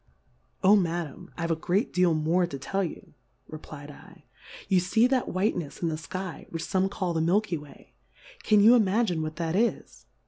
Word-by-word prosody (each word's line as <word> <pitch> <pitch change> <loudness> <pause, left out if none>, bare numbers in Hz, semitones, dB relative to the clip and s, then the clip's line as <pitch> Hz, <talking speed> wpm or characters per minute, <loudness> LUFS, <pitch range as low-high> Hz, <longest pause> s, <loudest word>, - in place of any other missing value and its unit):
Oh, 195 +3 +7
Ma 175 -3 +1
dam, 175 +5 -11
I've 165 -1 -2
a - - +2
great 180 - -1
deal 180 -3 +3
more 165 +3 +1
to 140 - -6
tell 195 +8 -2
ye, 170 - -7 0.3
reply 155 -1 -10
dl^ 145 0 -14 0.4
you 185 -2 +3
fee 220 +6 +3
that 255 0 +1
whitenefs 180 -6 -2
in 170 - +1
the 155 - -2
Sky, 185 +2 -6
which 165 0 -5
fome 190 0 0
call 185 -3 -2
the 160 - 0
Milky 185 +3 +1
way; 145 -1 -16 0.5
can 210 - +4
you 225 +4 +8
imagine 210 -6 +2
what 155 0 -4
That 165 0 -2
is 230 +4 -1
180 Hz, 185 wpm, -27 LUFS, 160-195 Hz, 0.5 s, you